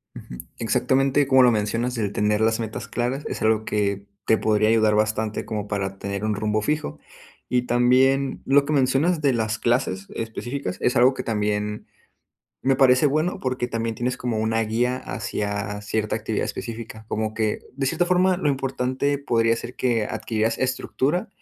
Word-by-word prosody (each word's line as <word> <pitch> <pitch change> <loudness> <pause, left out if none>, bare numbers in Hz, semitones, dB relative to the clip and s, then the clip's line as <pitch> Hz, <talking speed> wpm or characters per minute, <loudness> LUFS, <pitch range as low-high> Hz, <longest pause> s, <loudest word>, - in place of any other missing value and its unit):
Ujú. 60 - -10 0.2
Exactamente 135 +2 +2
como 130 -1 +6
lo 125 - +6
mencionas, 115 +3 -1
el 105 -3 -1
tener 105 +1 +1
las 110 +1 +2
metas 110 -1 -5
claras 125 +4 -2
es - - -5
algo 110 0 +2
que, 100 -1 -1 0.2
te 110 - +4
podría 110 0 +2
ayudar 110 -1 +4
bastante 110 0 0
como 105 -1 -4
para 95 -2 -3
tener 100 +1 -4
un 110 -1 0
rumbo 105 +1 0
fijo. 150 +6 -2 0.5
Y 125 -1 +2
también, 130 +3 +2
lo 140 +1 +4
que 150 - -3
mencionas 140 +5 +2
de 140 -3 +3
las 110 -2 -1
clases 110 -6 0
específicas 115 -2 -4
es 125 - +1
algo 125 +3 +5
que - - -4
también 105 -1 -2 0.8
me 135 0 +3
parece 130 0 +5
bueno, 155 +5 0
porque 125 -1 -2
también 115 -1 -2
tienes 125 +3 -2
como 120 -3 -2
una 110 +1 +1
guía 120 +3 0
hacia 105 -4 -4
cierta 105 +1 -1
actividad - - -2
específica, 115 -1 -7
como 110 0 -2
que, 110 -1 -1 0.2
de 135 -1 -1
cierta 175 +6 +1
forma, 180 0 +3
lo 155 - 0
importante 135 +1 -1
podría 115 -4 +2
ser 120 +2 -8
que 120 -4 +1
adquirieras 110 0 -1
estructura 130 +5 -1
115 Hz, 170 wpm, -23 LUFS, 110-130 Hz, 0.8 s, como